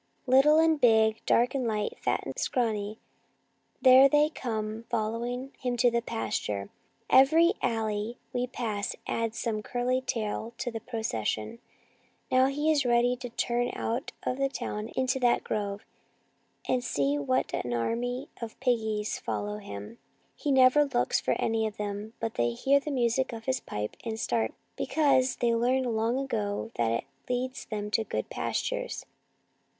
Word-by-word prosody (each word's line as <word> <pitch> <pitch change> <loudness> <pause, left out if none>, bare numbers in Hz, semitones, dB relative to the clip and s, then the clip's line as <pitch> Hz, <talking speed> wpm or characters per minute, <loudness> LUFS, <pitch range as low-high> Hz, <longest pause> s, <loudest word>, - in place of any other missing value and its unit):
Little 270 +4 +6
and 320 -2 +4
big, 220 -2 +4
dark 240 +1 +3
and 260 -3 -1
light, 210 -2 -2
fat - - 0
and - - -4
scrawny, 215 -4 -1 0.9
there 260 +1 +8
they 295 +2 +4
come 220 -4 -4
follow 225 0 -1
ing 250 +3 -4
him 245 -1 -2
to 235 0 +3
pasture. 105 - -3 0.4
Every 325 +7 +6
alley 220 0 -1 0.2
we 250 0 0
pass 220 -5 -3
adds 230 0 -2
some 220 -2 -1
curly 250 +3 0
tail 225 -1 -3
to 245 0 -3
the 225 - -4
procession. 115 - -3 0.7
Now 255 +1 +5
he 295 +3 +1
is 295 -2 +3
ready 245 0 +3
to 245 0 -6
turn 240 +1 0
out 235 +3 -2
of 255 - -2
the 275 0 +2
town 215 -5 -4
into 260 0 +1
that 245 -2 +3
grove, 205 -1 -3 0.8
and 250 -1 +1
see 145 - 0
what 135 -2 0
an 120 - -2
army 245 - -1
of 230 -1 -7
piggies 220 -4 0
follows 210 +1 -3
him! 100 - -8 0.4
He 290 - -2
never 265 +2 +6
looks 265 -4 +1
for - - 0
any 225 -1 +1
of 215 - -8
them, 210 +1 -4
but 225 - -2
they 120 0 0
hear 275 - +3
the 290 - -6
music 255 -1 +1
of 225 -1 -7
his 260 -1 0
pipe 105 0 -5
and 225 -1 -4
start 230 -1 0 0.2
because 275 -4 +2
they 235 -1 +1
learned 245 +1 +1
long 225 +3 +1
ago 225 -5 -2
that 115 -1 +1
it 115 - 0 0.3
leads 255 +1 -2
them 210 -1 -4
to 225 - +2
good - - -4
pastures." - - -2
235 Hz, 160 wpm, -28 LUFS, 215-260 Hz, 0.9 s, there